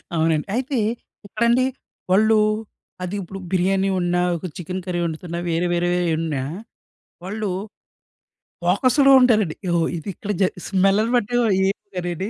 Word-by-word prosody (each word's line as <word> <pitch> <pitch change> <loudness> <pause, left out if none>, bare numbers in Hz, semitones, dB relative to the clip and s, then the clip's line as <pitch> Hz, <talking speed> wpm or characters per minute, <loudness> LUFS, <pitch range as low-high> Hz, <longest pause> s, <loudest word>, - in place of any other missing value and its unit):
అవునండి. 160 -1 +1
అయితే 260 +2 -1 0.5
ఇక్కడండి 235 +4 +2 0.5
వాళ్ళు 215 +3 +5 0.7
అదిప్పుడు 195 +1 -5
బిర్యానీ 190 +1 +2
వండినా 175 -1 +1 0.2
ఒక 165 - -8
చికెన్ 180 +2 -5
కర్రీ 180 -2 -2
వండుతున్నా 170 +1 -4
వేరే 170 +2 +1
వేరేయి 175 0 +1
వండినా 155 -4 -2 0.8
వాళ్ళు 210 +2 -3 1.2
ఫోకస్‌డ్‌గా 255 +10 +4
ఉంటారండి. 215 -10 +3 0.2
ఓహొ! 170 -1 +2
ఇది 165 - -6
ఇక్కడ 205 - -4
జ - - +6 0.2
స్మెల్ల్‌ని 195 +4 +2
బట్టి 240 -1 0
వొ - - +2 0.2
ఏం 195 - 0 0.2
కర్రీ 175 -1 -2
అని. 195 +4 -3
185 Hz, 130 wpm, -22 LUFS, 175-215 Hz, 1.2 s, జ